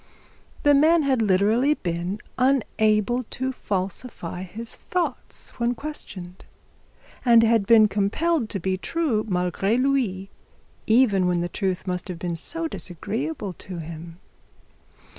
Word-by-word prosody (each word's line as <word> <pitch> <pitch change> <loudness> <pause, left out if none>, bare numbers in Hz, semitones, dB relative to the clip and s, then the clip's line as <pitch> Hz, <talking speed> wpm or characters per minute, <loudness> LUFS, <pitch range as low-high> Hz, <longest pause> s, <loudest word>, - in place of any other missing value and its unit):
The 290 - +6
man 315 +3 +5
had 265 -4 +2
literally 220 +8 +3
been 175 - -3 0.2
unable 240 -3 +2
to 260 +4 -3
falsify 190 -4 -4
his 220 +5 -6
thoughts 340 -8 -4
when 240 +1 +1
questioned, 190 -11 -8 0.8
and 235 -2 +6
had 225 -3 +3
been 220 -2 +7
compelled 220 +7 0
to 195 - -3
be 185 +1 -1
true 280 - 0
malgre 185 +2 0
lui, 250 -8 0 0.6
even 220 -5 +4
when 175 -1 +1
truth 190 -2 -2
must 180 -1 -3
have 180 -2 -5
been 170 0 -3 0.4
disagreeable 205 - -4
to 180 0 -9
him. 165 +1 -8
210 Hz, 120 wpm, -24 LUFS, 185-255 Hz, 0.8 s, been